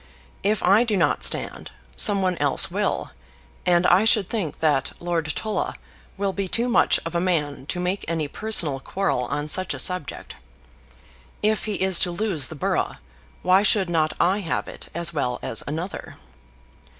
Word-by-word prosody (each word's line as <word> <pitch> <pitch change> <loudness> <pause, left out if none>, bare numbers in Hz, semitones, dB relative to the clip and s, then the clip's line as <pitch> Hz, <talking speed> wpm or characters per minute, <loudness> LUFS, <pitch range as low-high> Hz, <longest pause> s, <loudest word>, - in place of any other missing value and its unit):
If 210 +1 0
I 200 +6 +5
do 220 -4 0
not - - +1
stand, - - 0 0.3
some 200 -3 +4
one 185 -1 +1
else 140 -2 +3
will, - - -1 0.6
and 175 0 +4
I 180 +4 +5
should 215 -3 +2
think 200 -10 -3
that 145 -4 +1
Lord 170 -2 -2
Tulla 215 -1 -2 0.4
will 195 -1 -1
be 195 -1 -3
too 235 +6 0
much 245 - +3
of 165 - -4
a 170 - 0
man 150 -6 -1
to 180 - -3
make 180 +2 -2
any 160 -2 -1
personal 160 -7 +1
quarrel 160 -4 -1
on 145 +4 -3
such 185 +4 +1
a - - -6
subject. 180 -6 -4 1.1
If 215 0 +1
he 215 -2 -2
is 190 -2 +3
to 180 - +3
lose 175 -6 0
the 160 - -8
borough, 145 - -1 0.5
why 185 +2 +5
should 200 -3 +2
not 155 -2 +1
I 185 +4 +2
have 170 -6 -2
it - - -10
as 170 0 -2
well 125 -5 -1
as 115 - -1
another? 165 +6 -5
180 Hz, 175 wpm, -23 LUFS, 155-200 Hz, 1.1 s, I